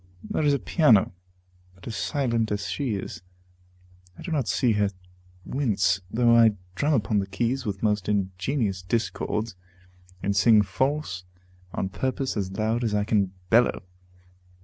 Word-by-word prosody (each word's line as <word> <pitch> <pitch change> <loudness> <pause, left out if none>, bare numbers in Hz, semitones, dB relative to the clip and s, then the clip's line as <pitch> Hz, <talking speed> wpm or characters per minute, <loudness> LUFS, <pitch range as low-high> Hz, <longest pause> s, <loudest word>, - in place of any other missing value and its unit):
There - - -1
is 145 -2 +3
a - - +1
piano, 125 - +4 0.6
but 95 - -16
as 115 - -5
silent 115 -6 0
as 105 0 -2
she 130 -7 -2
is. 95 -2 -6 1.0
I - - -10
do 180 - -5
not 140 -7 0
see 125 - +2
her 105 -2 +2 0.6
wince, 95 -9 +1
though 120 +2 +4
I 115 -2 +6 0.2
drum 145 +10 +1
upon 105 -3 +1
the 95 - -2
keys 120 +1 -1
with 100 0 -4
most 105 -3 +1
ingenious 100 +1 -1
discords, 110 +2 -2 0.7
and 100 0 0
sing 105 +2 +6
false 100 - -2 0.5
on 95 - -2
purpose 130 +5 -2
as 100 -3 -2
loud 110 +2 0
as 110 -3 0
I 105 - +2
can 100 -3 +1 0.2
bellow. 120 -1 +4
110 Hz, 150 wpm, -26 LUFS, 100-125 Hz, 1.0 s, I